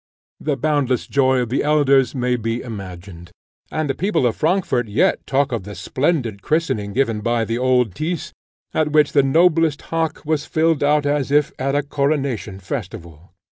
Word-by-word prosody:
The 145 -3 -2
boundless 140 -3 0
joy 130 -2 +2
of 120 - -3
the 130 - 0
elders 140 -3 +3
may 125 -1 0
be 115 0 -2
imagined, 90 -6 -9 0.4
and 155 -1 -2
the 135 - 0
people 190 -4 0
of 115 - +1
Frankfort 155 - 0
yet 105 - +1
talk 140 +1 +1
of 115 -4 -2
the 100 +2 -9
splendid 120 - -1
christening 110 -9 -1
given 115 -4 0
by 115 +1 0
the 115 +1 -2
old 125 -5 +2
Tyss, 160 +2 -4 0.4
at 155 -1 +1
which 150 -1 +4
the 140 - +4
noblest 160 +1 +3
hock 160 -1 -1
was 150 -1 -1
filled 160 -2 +1
out 145 0 +2
as 145 -2 0
if 145 0 +2
at 135 +1 0
a 145 - +1
coronation 140 -8 -2
festival. 90 - -7
135 Hz, 175 wpm, -20 LUFS, 115-150 Hz, 0.4 s, which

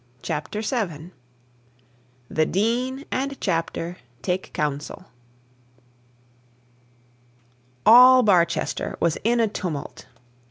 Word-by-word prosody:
CHAPTER 180 +8 -4
VII 180 - -3 1.2
THE 155 +3 0
DEAN 250 - -1
AND 275 +1 -3
CHAPTER 170 -1 -2 0.3
TAKE 185 0 -2
COUNSEL 150 +4 -4 2.8
All 250 +2 +8
Barchester 180 -5 +1
was 170 -2 0
in 235 +2 +2
a 225 - +3
tumult. 175 -8 -6
195 Hz, 80 wpm, -23 LUFS, 165-240 Hz, 2.8 s, All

